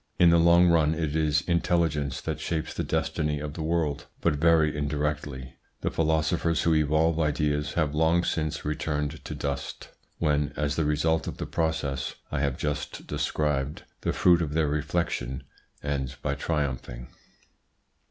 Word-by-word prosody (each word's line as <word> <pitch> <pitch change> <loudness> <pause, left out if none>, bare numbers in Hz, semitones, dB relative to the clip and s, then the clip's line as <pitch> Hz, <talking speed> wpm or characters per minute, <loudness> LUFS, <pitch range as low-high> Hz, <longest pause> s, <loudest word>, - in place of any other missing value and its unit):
In 85 -2 +6
the 85 - +5
long 85 +1 +6
run 80 -2 +3
it 80 -2 -2
is 75 -1 +2
intelligence 80 -5 0
that 80 -1 -3
shapes 80 0 -2
the - - -2
destiny 75 -1 -1
of 75 0 -5
the 80 - -6
world, 80 -3 -1
but - - +2
very 80 -1 +4
indirectly. 75 -3 -3 0.2
The - - -1
philosophers 80 +1 +1
who 85 - +3
evolve 80 +2 +2
ideas 75 -1 0
have 75 -4 0
long 80 +3 +3
since 80 -3 -2
returned 75 -1 -2
to - - -6
dust, 70 -1 -4 0.3
when, 75 -2 +1
as 75 -2 0
the 80 - +1
result 80 +2 +1
of - - -5
the - - -4
process 70 -5 -1 0.2
I 75 - -1
have 70 -2 0
just 75 -1 -3
described, 75 -1 -1 0.2
the - - 0
fruit 85 -1 +4
of 75 -2 -2
their 80 -2 +2
reflection 75 -4 -2 0.4
ends 70 -2 -2
by 70 - -2
triumphing. 70 -4 -3
75 Hz, 155 wpm, -27 LUFS, 75-80 Hz, 0.4 s, In